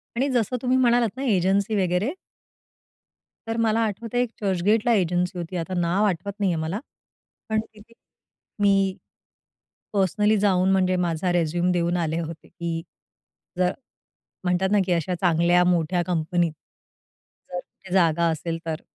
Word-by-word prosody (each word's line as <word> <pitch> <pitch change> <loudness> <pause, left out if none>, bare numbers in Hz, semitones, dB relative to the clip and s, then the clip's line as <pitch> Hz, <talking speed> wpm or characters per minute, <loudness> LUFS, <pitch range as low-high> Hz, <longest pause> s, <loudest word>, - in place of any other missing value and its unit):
आणि 270 +4 +1
जसं 245 0 0
तुम्ही 255 0 +2
म्हणालात 240 -2 +3
ना 270 - -3
एजन्सी 200 0 +2
वगैरे 180 - 0 1.3
तर 225 0 -2
मला 225 0 +2
आठवतं 220 +3 -5
आहे, 245 - +4
एक 240 - -4
चर्चगेटला 205 +4 +2
एजन्सी 180 -1 0
होती, 175 +1 -5
आता 175 +3 -4
नाव 175 +5 +1
आठवत 200 +1 -1
नाही 195 -3 +2
आहे 160 -2 -1
मला. 170 +7 -2 0.7
पण 220 0 +2
तिथे 215 +2 -17 0.7
मी, 195 -2 +3 1.0
पर्सनली 210 +2 +2
जाऊन 190 -2 +3
म्हणजे 185 -1 +2
माझा 170 +2 -1
रिझ्यूम 175 +1 +1
देऊन 175 0 +1
आले 165 -1 -1
होते 165 -1 -7
की 170 -2 -4 0.8
जर 180 0 +2 0.7
म्हणतात 180 +1 +1
ना 210 - +4
की 180 - -2
अशा 175 +2 -1
चांगल्या 175 0 +4
मोठ्या 175 0 +2
कंपनीत. 170 0 0 1.0
जर 180 - -3
कुठे 185 0 -12
जागा 170 -2 +3
असेल 165 +1 -3
तर, 160 -1 -3
185 Hz, 145 wpm, -24 LUFS, 170-210 Hz, 1.3 s, आहे